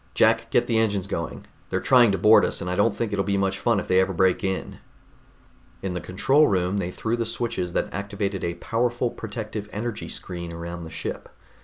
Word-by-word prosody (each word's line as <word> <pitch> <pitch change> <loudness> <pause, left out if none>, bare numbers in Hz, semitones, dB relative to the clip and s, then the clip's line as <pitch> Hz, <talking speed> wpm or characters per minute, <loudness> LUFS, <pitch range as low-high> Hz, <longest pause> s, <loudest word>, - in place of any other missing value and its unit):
"Jack, - - +3
get - - +3
the 115 -1 +2
engines 100 -4 +1
going. 85 -5 -4 0.2
They're - - 0
trying 120 -4 +5
to 95 - 0
board 105 +4 +6
us, - - 0
and 90 - -4
I - - 0
don't 100 +2 +2
think 115 -3 -2
it'll 100 -1 +1
be 100 +1 0
much 95 0 0
fun 115 -1 +2
if - - -5
they 95 - +4
ever 95 +1 0
break 95 +4 +2
in." 95 -1 -3 1.0
In 95 -2 -2
the 90 - -3
control 135 - +3
room 95 +1 +1
they 90 - -2
threw 110 +5 -2
the 120 - -1
switches 115 -6 -2
that - - -1
activated 100 -1 -3
a 85 0 -2
powerful 120 +5 -1
protective 105 -1 -6
energy 110 +1 -4
screen 85 -2 -6
around 85 0 -6
the - - -8
ship. 80 - -5
100 Hz, 210 wpm, -25 LUFS, 90-115 Hz, 1.0 s, board